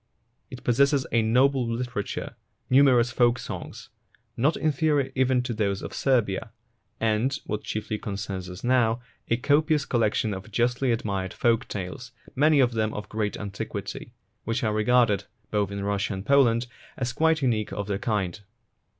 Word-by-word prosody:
It 125 -1 -10
possesses 140 +3 +3
a 115 - +3
noble 130 +4 +3
litera 120 -1 -2
ture, - - -6 0.4
numerous 130 -3 +5
folk 120 0 +3
songs, - - -7 0.5
not 145 +7 +2
inferior 150 -2 +1
even 130 -1 +2
to 125 -1 -3
those 100 -3 -1
of - - -6
Serbia, 115 -8 +1 0.5
and, 115 +5 +1
what 105 0 -3
chiefly 110 0 -3
concerns 100 -3 -5
us 90 +1 -9
now, 120 -2 +2 0.3
a 115 - +2
copious 150 +3 +2
collection 110 -2 +1
of 95 +2 -7
justly 120 +4 +1
admired 100 -5 -2
folk 120 +1 +1
tales, 105 +6 -6 0.2
many 150 +2 +4
of 125 -2 +4
them 110 -1 -1
of 105 - -6
great 105 -1 -2
antiquity, 100 -2 -6 0.3
which 115 +4 -2
are 110 -2 +1
regarded, 110 -2 +3 0.3
both 105 -2 +1
in 100 0 -4
Russia 100 0 -1
and 95 +1 -7
Poland, 125 -4 +4 0.3
as 125 -2 -2
quite 160 -2 +2
unique 110 -5 0
of 100 - -3
their 100 -1 -2
kind. 100 -5 -1
115 Hz, 160 wpm, -26 LUFS, 105-130 Hz, 0.5 s, numerous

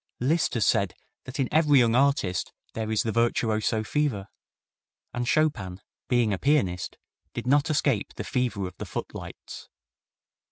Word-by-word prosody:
Liszt 150 +5 +1
has 110 -5 +2
said - - +2 0.3
that 130 +2 -7
in 135 - +2
every 150 -2 +5
young 120 -3 +4
artist 130 -8 +2 0.2
there 110 -1 -3
is 110 - +2
the 115 - -1
virtuoso 110 -1 +1
fever, 120 -7 -1 0.8
and 120 0 -2
Chopin 105 -12 +1 0.3
being 120 -4 +2
a 95 - -2
pianist 130 -12 +1 0.4
did - - -4
not 145 +4 +3
escape 140 -8 +1
the - - -4
fever 120 -6 -1
of 90 0 -7
the - - -6
footlights. - - -7
120 Hz, 150 wpm, -27 LUFS, 105-140 Hz, 0.8 s, every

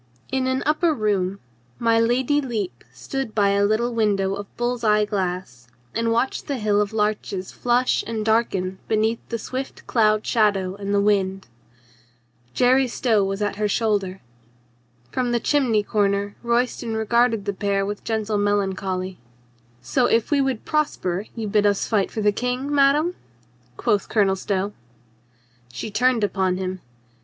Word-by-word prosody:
In 265 -1 0
an 260 +1 0
upper 310 +2 +2
room 200 -4 0 0.4
my 230 -1 +3
Lady 255 +5 +2
Lepe 210 - -4
stood 215 - -5
by 200 -2 +3
a 200 0 +2
little 220 +4 +1
window 200 -4 +1
of 200 0 -5
bull's 240 0 -1
eye 210 -1 +4
glass 180 - -3 0.3
and 230 0 0
watched 235 +3 0
the 280 - -2
hill 210 -2 +2
of 205 0 -1
larches 210 -3 -2
flush 245 +1 +1
and 220 -2 -3
darken 195 -4 0
beneath 220 +1 +1
the 230 - -2
swift 260 +4 -6
cloud 215 -2 +2
shadow 200 -5 +2
and 200 0 -5
the 200 - +3
wind. 195 -2 +1 1.1
Jerry 255 +1 +4
Stow 230 -3 +1
was 195 +1 -2
at 205 -1 -2
her 210 0 +1
shoulder. 205 -3 0 0.9
From 245 -2 -1
the 235 - +2
chimney 240 -6 +2
corner 200 -1 0
Royston 235 -1 0
regarded 225 -1 +2
the 200 - -1
pair 200 0 0
with 205 +1 -5
gentle 220 -2 -1
melan 205 -1 +1
choly. 185 -1 -4 0.7
"So 250 - +2
if 230 +4 +1
we 285 -1 +4
would 265 -4 -1
prosper 210 - -1
you 225 -2 -3
bid 210 0 +3
us 200 -1 +1
fight 205 -4 +1
for 220 - -4
the 210 - +4
King, 250 +6 -2
madame?" 290 +5 +3 0.6
quoth 205 - 0
Colonel 200 -3 +3
Stow. 195 +1 -2 1.0
She 170 - -6
turned 245 +1 +2
upon 190 -2 +1
him. 185 -1 -4
215 Hz, 155 wpm, -23 LUFS, 200-240 Hz, 1.1 s, eye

